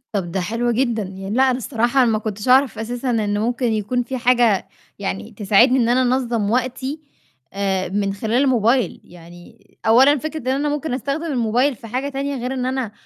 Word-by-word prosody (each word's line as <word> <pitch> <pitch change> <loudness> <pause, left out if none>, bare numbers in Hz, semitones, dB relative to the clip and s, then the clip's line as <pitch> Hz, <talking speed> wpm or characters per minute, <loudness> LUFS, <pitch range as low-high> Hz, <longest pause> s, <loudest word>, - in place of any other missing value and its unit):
طَب 180 -4 -2
ده 190 - -1
حلو 230 +6 -1
جدًا، 235 -2 0
يعني 195 0 -8
لأ 260 - +4
أنا 250 - -1
الصراحة 245 +1 +1
أنا 235 - +2
ما 215 - +1
كنتش 215 0 -5
أعرف 260 -3 +4
أساسًا 245 +3 -4
إن 210 -3 0
ممكن 240 +3 -1
يكون 220 +4 -1
في 260 +2 -5
حاجة 240 -4 +2 0.3
يعني 200 +2 -4
تساعدني 215 +5 +3
إن 235 -1 +2
أنا 250 +2 +3
أنظّم 245 -4 0
وقتي، 260 +4 -2 0.5
آآ 190 -2 -1
من 195 +1 -1
خلال 220 +6 0
الموبايل، 245 -1 +1
يعني 175 +5 -16 0.2
أولًا 260 +6 +5
فكرة 310 +3 -5
إن 255 - -10
أنا 275 +3 0
ممكن 295 -1 -3
أستخدم 280 +4 -3
الموبايل 250 -1 +1
في 230 - -12
حاجة 255 +5 -3
تانية 280 0 -3
غير 250 0 -3
إن 255 -1 -2
أنا 255 -4 -2
240 Hz, 195 wpm, -20 LUFS, 210-260 Hz, 0.5 s, أولًا